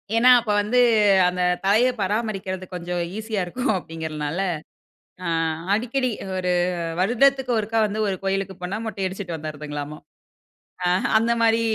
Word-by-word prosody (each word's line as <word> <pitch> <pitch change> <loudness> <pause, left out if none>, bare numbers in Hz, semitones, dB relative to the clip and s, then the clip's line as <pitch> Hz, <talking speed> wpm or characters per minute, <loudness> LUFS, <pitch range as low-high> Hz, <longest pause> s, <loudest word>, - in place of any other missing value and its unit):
ஏன்னா, 240 +2 +5
அப்ப 230 -3 -2
வந்து 215 +5 0 0.5
அந்த 180 0 -1 0.2
தலைய 220 +6 +4
பராமரிக்கிறது 195 -2 -2
கொஞ்சம் 175 0 -3 0.2
ஈசியா 220 -2 -2
இருக்கும் 250 +10 -3
அப்பிடிங்கிறனால, 160 -2 -4 0.9
அ - - -1 0.5
அடிக்கடி 250 +4 0 0.3
1 180 -1 0 0.5
வருடத்துக்கு 255 +6 +3
ஒருக்கா 220 +1 -1
வந்து 210 +1 -3
ஒரு 195 - 0
கோயிலுக்கு 195 0 -1
போனா 180 +3 -3
மொட்டை 210 -3 -4
அடிச்சிட்டு 185 -2 -5
வந்துர்றதுங்களாம்மா! 150 -1 -6 0.9
அ, - - +3 0.2
ஹ - - +3
அந்தமாரி 230 0 +2
195 Hz, 130 wpm, -23 LUFS, 180-225 Hz, 0.9 s, ஏன்னா